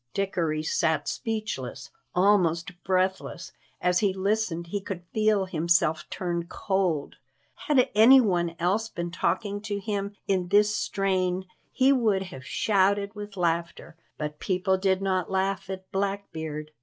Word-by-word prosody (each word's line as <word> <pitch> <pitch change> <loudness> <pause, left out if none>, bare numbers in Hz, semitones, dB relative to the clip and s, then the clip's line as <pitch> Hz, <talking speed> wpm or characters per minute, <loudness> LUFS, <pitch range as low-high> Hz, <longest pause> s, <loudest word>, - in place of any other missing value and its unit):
Dickory 170 -6 -1
sat 155 -1 0
speechless, 140 - -4 0.2
almost 180 -2 +3
breathless. 185 -2 -1 0.3
As 180 0 +2
he 195 -3 +1
listened 195 -3 0
he 200 +4 -3
could 190 -2 -6
feel 215 -2 +2
himself 165 -2 +1
turn 170 -2 -3
cold. 190 -8 -1 0.5
Had 270 -4 +4
any 235 +6 +8
one 175 -7 +1
else 195 +7 0
been 170 -3 -4
talking 205 +3 -1
to 210 -1 -3
him 200 0 -3
in 185 -2 +1
this 210 +3 +4
strain 185 -2 0 0.3
he 265 +2 +4
would 215 -7 +2
have 150 -9 -10
shouted 200 +4 +1
with 205 -1 -8
laughter, 170 -1 -2 0.2
but 150 -1 -5
people 185 0 +1
did 190 0 +1
not 185 -2 0
laugh 190 0 -1
at 190 0 -7
Blackbeard. 160 -6 -3
190 Hz, 135 wpm, -27 LUFS, 170-205 Hz, 0.5 s, any